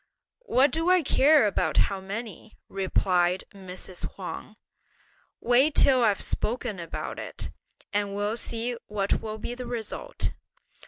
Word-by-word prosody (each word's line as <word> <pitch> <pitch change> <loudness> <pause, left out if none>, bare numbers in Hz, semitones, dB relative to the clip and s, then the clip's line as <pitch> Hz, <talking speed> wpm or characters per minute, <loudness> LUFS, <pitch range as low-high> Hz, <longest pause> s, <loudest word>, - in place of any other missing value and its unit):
"What 265 +2 +4
do 325 +4 +1
I 365 -2 +5
care 285 0 +5
about 180 -7 0
how 195 -1 +3
many?" 215 +2 -7
replied 185 -2 +1
Mrs. 185 -2 -6
Huang; - - -7 0.8
"wait 260 +5 +3
till 260 -3 +5
I've 210 -3 +3
spoken 225 -3 -2
about 170 -1 -5
it, - - -5 0.4
and 205 -1 0
we'll 205 +3 -1
see 235 +1 -2
what 200 -1 0
will 215 -1 -5
be 235 - -5
the 250 0 -6
result." 240 - -3
215 Hz, 130 wpm, -27 LUFS, 195-250 Hz, 0.8 s, I